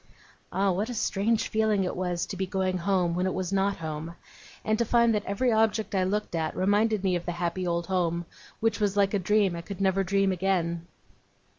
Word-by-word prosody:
Ah, 195 0 +2
what 200 +6 -1
a 245 - -4
strange 215 +1 +1
feeling 215 -3 +2
it 180 - -2
was 180 -1 -1
to 200 - -6
be 190 0 -2
going 185 -1 -1
home 180 -1 +1
when 180 +2 0
it 185 - -2
was 185 0 -2
not 195 +1 +1
home, 160 +1 -5 0.5
and 215 - +2
to - - +4
find 235 0 +3
that 210 -1 0
every 235 +5 +1
object 220 -1 +1
I 190 -1 +2
looked 210 +1 -2
at, 160 -1 -1
reminded 205 +2 +2
me 185 -2 +2
of 175 0 -4
the 175 - -1
happy 175 +1 -2
old 170 0 -1
home, 175 -2 0 0.4
which 225 0 +1
was 205 -1 0
like 200 0 +3
a 205 - +2
dream 200 -1 +2
I 170 - -5
could 195 +3 -8
never 195 0 +2
dream 195 +1 +2
again! 170 -2 -1
190 Hz, 215 wpm, -27 LUFS, 175-210 Hz, 0.5 s, to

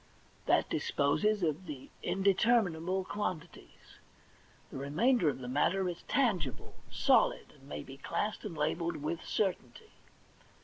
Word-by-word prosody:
That - - +3
disposes 200 +9 +1
of 160 +3 -1
the 140 -3 -8
indeterminable 190 -3 +2
quantities; 185 -6 -6 0.7
the - - -6
remainder 175 - +2
of 140 - -3
the 125 -1 -7
matter 180 +9 +1
is 175 -1 -4
tangible, 175 - 0 0.2
solid, - - +2
and - - -18
may 75 0 -5
be 135 - -11
classed 210 +8 -3
and 180 -7 -6
labelled 165 +3 0
with 160 +3 -3
certainty. 215 - -2
175 Hz, 125 wpm, -32 LUFS, 145-205 Hz, 0.7 s, That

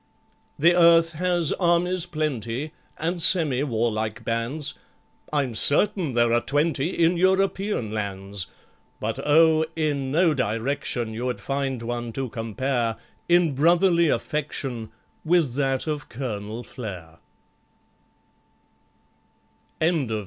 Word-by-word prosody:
The 170 +4 +5
earth 170 -1 +5
has 175 -1 0
armies 175 0 +1
plenty, 150 -4 -3 0.3
And 170 +2 -2
semi 155 -6 +4
warlike 115 -3 -2
bands, 115 +6 -1 0.6
I'm 140 -5 0
certain 165 - +3
there 120 -1 +3
are 120 - +3
twenty 145 +1 0 0.2
In 170 +2 +2
European 190 - +1
lands; 100 -3 -4 0.5
But, 110 +1 -3
oh! 160 +1 +4
in 145 -4 -1
no 165 +3 +3
direction 115 -1 -2
You'd 125 +2 -3
find 135 -3 -3
one 120 0 -4
to 135 0 -3
compare 115 +1 -2 0.3
In 175 -3 +4
brotherly 170 +3 +3
affection 135 -8 -3 0.3
With 165 -6 +2
that 135 -1 0
of 150 -2 -4
COLONEL 110 -2 -5
FLARE. 90 -11 -9 2.6
LOST 160 -6 +1
MR. 110 -1 -1
140 Hz, 110 wpm, -24 LUFS, 115-165 Hz, 2.6 s, The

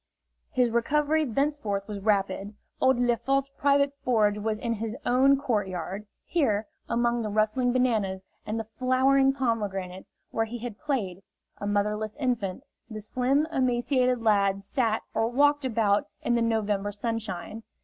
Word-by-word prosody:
His 250 -5 +2
recovery 300 +6 +2
thenceforth 235 -6 -1
was 210 -2 -5
rapid. 200 0 0 0.3
Old 260 -1 +4
Lefort's 265 +3 +1
private 280 0 +2
forge 210 -4 +2
was 215 0 -1
in 230 +1 -2
his 225 +1 -4
own 270 +3 +4
court 235 -8 0
yard. 185 +3 -5 0.2
Here, 220 -11 +1 0.2
among 235 0 +1
the 215 - -3
rustling 215 +4 +1
bananas 215 -7 0 0.2
and 215 +2 -3
the 225 - -4
flowering 265 +1 +4
pomegranates, 205 -8 -3 0.2
where 225 - 0
he 235 +2 -6
had 235 -3 -7
played, 205 -11 -2 0.4
a 205 - -4
motherless 210 +2 -1
infant, 245 -6 -2 0.3
the 215 -1 -6
slim, 255 +7 +1
emaciated 250 -2 +1
lad 200 -2 +2
sat 225 +1 0
or 225 - +1
walked 290 +3 +3
about 215 -4 +2 0.2
in 240 - +1
the 235 - +2
November 210 -3 0
sunshine. 220 -1 -4
230 Hz, 145 wpm, -27 LUFS, 205-255 Hz, 0.4 s, Old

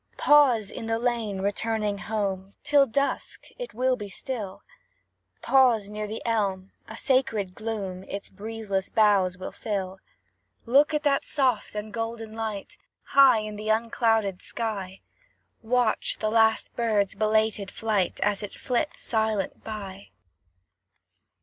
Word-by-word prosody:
Pause, 255 -9 +5
in 225 - -6
the 225 0 +1
lane, 230 -5 -1
returning 205 0 -1
home; 200 -3 -3
'Tis 285 -2 +4
dusk, 280 +4 -2
it - - -6
will 255 +1 +2
be 205 -4 -7
still: 210 -4 -6 0.8
Pause 240 -6 +4
near 210 0 -4
the 220 +2 -6
elm, 195 -4 -1 0.2
a 220 - -8
sacred 230 -9 +1
gloom 205 -4 -4
Its 200 0 -6
breezeless 210 -3 -4
boughs 200 -4 +3
will 185 - -6
fill. 190 -3 -4 0.7
Look 280 +6 +4
at 300 - 0
that 280 -2 +2
soft 255 -8 0
and 210 0 -5
golden 225 -1 -4
light, 220 -3 -5 0.3
High 265 -5 +6
in 215 0 -6
the 215 +1 -5
unclouded 225 -3 +1
sky; 195 -5 -4 0.6
Watch 240 0 +1
the 215 -1 -1
last 225 0 +3
bird's 215 -4 +1
belated 215 -1 +1
flight, 210 -4 -1
As 205 0 +1
it 205 - -7
flits 265 +4 -1
silent 220 -3 -1
by. 200 -3 -7
220 Hz, 130 wpm, -26 LUFS, 200-230 Hz, 0.8 s, High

